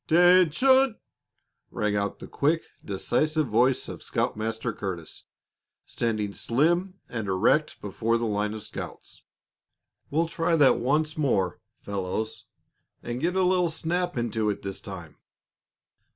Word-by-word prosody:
"'Tention!" 185 - +5 0.7
rang 105 -1 -1
out 100 -1 -1
the - - -9
quick, 160 +3 +1 0.2
decisive 150 - 0
voice 125 +3 +2
of - - -8
Scoutmaster 110 +1 -2
Curtis, 90 -6 -6 0.6
standing 110 -3 -2
slim 175 - +1
and 110 -4 -4
erect 95 -1 +2
before 115 +1 0
the 115 - -2
line 105 0 -1
of 110 - -7
scouts. 110 - -9 0.9
"We'll 165 +3 +1
try 165 0 0
that 145 -4 +5
once 155 +5 0
more, 100 - +1 0.2
fellows, 100 +2 -4 0.6
and 120 +1 -4
get 175 +2 0
a 190 - +3
little 180 -1 +3
snap 175 +1 -1
into 110 -2 0
it 105 - -3
this 95 -1 -5
time. 90 -7 -9
120 Hz, 125 wpm, -26 LUFS, 105-165 Hz, 0.9 s, Tention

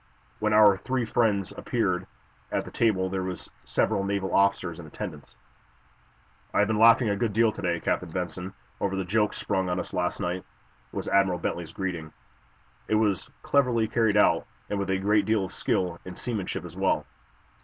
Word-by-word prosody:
When 110 0 +1
our 105 -2 +7
three 130 +4 -1
friends 105 -4 +1
appeared 95 -7 -1 0.4
at - - -2
table 100 -5 +2
there 95 0 -2
were 90 0 -3 0.3
several 100 - +1
naval 100 -1 -1
officers 100 -4 +2
in 80 - -9
attendance. 75 -3 -8 1.2
"I - - +3
have 105 - +4
been 110 -1 0
laughing 115 +1 +6
a 100 - +1
good 105 0 -1
deal 115 +1 +4
to - - -8
day, 85 -2 0
Captain 90 - -1
Benson, 90 +2 -4 0.2
over 100 -1 -1
the 95 -1 -2
joke 105 +3 +1
sprung 95 -2 -1
on 90 0 0
us - - -6
last 90 -1 -1
night," 90 +1 -2 0.5
was - - -4
Admiral 95 -2 +3
Bentley's 85 -1 -3
greeting. 85 -5 -4 0.8
"It 110 - +2
was 105 -4 +1
cleverly 125 -5 +2
carried 110 -2 +2
out, - - +4 0.2
and 100 - 0
with 100 -1 -2
a 95 - +2
great 105 +2 +2
deal 110 -3 +2
of - - -10
skill 90 -2 -1
in 90 -1 -8
seamanship 110 -7 -4
as - - -10
well." - - +1
100 Hz, 180 wpm, -27 LUFS, 90-110 Hz, 1.2 s, our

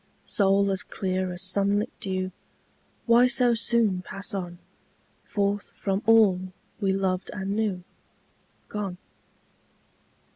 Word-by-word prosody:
Soul 200 0 +3
as 190 +1 0
clear 185 -1 -2
as 180 +1 -4
sunlit 200 +2 +1
dew, 185 -1 -2 0.7
Why 235 +1 +6
so 250 -1 +3
soon 225 -5 +1
pass 195 +2 -7
on, 175 -3 -4 0.7
Forth 200 0 -1
from 195 0 -1
all 195 -5 +5 0.3
we 195 -3 +1
loved 190 -1 -1
and 195 0 -3
knew 205 -4 -1 0.8
Gone? 200 -4 -4
195 Hz, 110 wpm, -26 LUFS, 185-210 Hz, 0.8 s, Why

